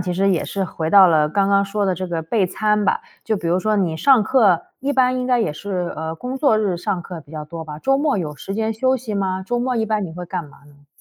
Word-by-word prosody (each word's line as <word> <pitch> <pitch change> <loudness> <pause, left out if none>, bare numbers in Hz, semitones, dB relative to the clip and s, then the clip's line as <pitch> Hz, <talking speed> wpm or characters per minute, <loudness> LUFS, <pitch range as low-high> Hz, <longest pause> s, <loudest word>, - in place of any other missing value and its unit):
其 180 0 -2
实 195 +2 +2
也 175 - 0
是 195 - -3
回 160 -2 -4
到 195 -2 +8
了 155 -2 +3
刚 195 +4 +1
刚 200 0 +3
说 200 +1 -2
的 190 - +1
这 185 +1 -4
个 170 -2 -3
备 190 +4 +1
餐 210 +3 0
吧。 465 - +1 0.2
就 220 - 0
比 175 -4 -3
如 175 +2 +2
说 215 +3 0
你 180 -6 0
上 265 +4 +5
课， 210 -7 +3 0.2
一 280 +2 -2
般 255 -1 +2
应 250 - -2
该 250 -1 +2
也 215 - 0
是， 180 +2 -4
呃， 160 +1 -4
工 250 +9 -5
作 270 -5 +3
日 200 -5 0
上 175 +1 -3
课 170 -1 -8
比 145 0 -18
较 155 -1 -5
多 160 +2 -8
吧？ 150 -1 -8
周 270 +6 +2
末 290 -3 +1
有 155 -6 -4
时 195 - -6
间 220 +1 -1
休 260 +4 +1
息 230 -4 -6
吗？ 190 -2 -1
周 240 +5 -1
末 250 +1 -1
一 225 -2 0
般 215 -2 -1
你 165 - -7
会 180 +1 -7
干 175 0 -4
嘛 145 - -17
呢？ 145 0 -22
195 Hz, 305 characters per minute, -20 LUFS, 170-220 Hz, 0.2 s, 到